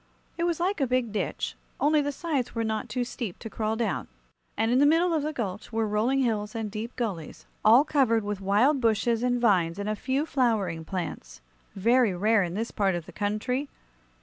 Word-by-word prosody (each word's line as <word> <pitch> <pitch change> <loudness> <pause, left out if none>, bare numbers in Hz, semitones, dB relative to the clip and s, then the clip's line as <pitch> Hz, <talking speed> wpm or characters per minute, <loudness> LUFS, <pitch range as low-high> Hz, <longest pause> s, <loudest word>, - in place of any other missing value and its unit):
It 340 - -1
was 340 -2 0
like 360 -1 0
a 270 - +2
big 250 -2 0
ditch, 210 - -2 0.3
only 300 +1 +3
the 290 0 -1
sides 280 -5 -2
were 230 - 0
not 220 +2 -2
too 245 +3 -1
steep 235 -5 -5
to 225 - -8
crawl 220 0 -1
down; 230 0 -2 0.5
and 225 +1 +1
in 250 - +4
the 290 - +6
middle 335 +3 +3
of 315 - +1
the 305 +2 -2
gulch 210 -8 -5
were 225 -1 0
rolling 230 +6 +1
hills 215 -2 -1
and 220 -2 -3
deep 225 +3 -5
gullies, 195 -10 -4 0.2
all 230 +6 +7
covered 260 -7 +2
with 205 -1 -4
wild 230 +9 +3
bushes 225 0 +2
and 245 0 +1
vines 185 -7 +2
and 200 0 -4
a 215 - 0
few 265 +7 -1
flowering 220 - 0
plants 180 - -5 0.3
very 230 0 +3
rare 215 +4 +3
in 175 -1 -2
this 225 +3 -3
part 195 -4 +1
of 170 -2 -4
the - - -11
country. 235 +7 -2
225 Hz, 205 wpm, -27 LUFS, 210-260 Hz, 0.5 s, all